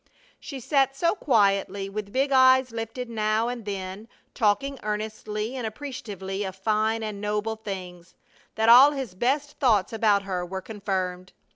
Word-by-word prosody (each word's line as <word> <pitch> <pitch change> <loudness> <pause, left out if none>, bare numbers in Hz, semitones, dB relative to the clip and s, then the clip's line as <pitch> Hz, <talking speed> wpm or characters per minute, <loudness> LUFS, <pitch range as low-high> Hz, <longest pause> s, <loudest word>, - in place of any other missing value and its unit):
She 275 -3 -7
sat 270 +1 +1
so 335 +4 +2
quietly, 200 - +1
with 200 0 -6
big 270 +4 +1
eyes 260 -1 +5
lifted 230 +2 -5
now 220 0 0
and 240 -3 -6
then, 195 +1 -5 0.3
talking 260 +5 +1
earnestly 215 +2 -4
and 245 -4 -3
appreciatively 205 -6 -6
of 190 -1 -5
fine 215 +3 0
and 210 -2 -5
noble 210 +1 -1
things, 185 -5 -8 0.4
that 220 0 +1
all 260 +5 +9
his 265 -9 -5
best 280 +8 -1
thoughts 225 -8 +2
about 210 -3 +2
her 185 -2 -3
were 190 +2 -5
confirmed. 190 -3 -4
215 Hz, 150 wpm, -25 LUFS, 195-250 Hz, 0.4 s, all